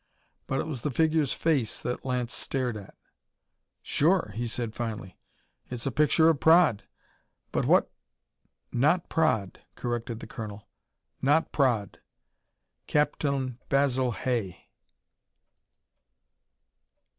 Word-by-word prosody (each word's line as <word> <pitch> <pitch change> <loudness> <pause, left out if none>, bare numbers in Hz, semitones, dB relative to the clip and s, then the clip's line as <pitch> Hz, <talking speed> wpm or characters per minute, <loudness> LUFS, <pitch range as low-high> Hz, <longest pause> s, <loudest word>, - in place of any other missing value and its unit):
But 135 - -1
it - - -1
was 145 -7 -5
the 150 - -1
figure's 155 0 +2
face 145 -9 0
that 125 - -4
Lance 125 -2 -2
stared 125 -3 -2
at. 100 -2 -10 0.9
"Sure," 165 - +2
he 120 +1 -2
said 115 -1 -3
finally. 110 -6 -5 0.5
"It's 125 0 -4
a 135 - 0
picture 155 +3 +4
of 160 -4 +3
Praed. 160 - +5 0.7
But - - 0
what - - +4 0.4
" - - -47 0.2
"Not 175 +3 +1
Praed," 115 - +1 0.2
corrected 120 -1 -3
the - - -8
colonel. 105 -3 -8 0.5
"Not 150 +4 +2
Praed. 120 -8 +1 0.9
Captain 140 -4 0
Basil 130 -3 +2
Hay." 115 -7 -3
130 Hz, 110 wpm, -28 LUFS, 115-150 Hz, 0.9 s, Praed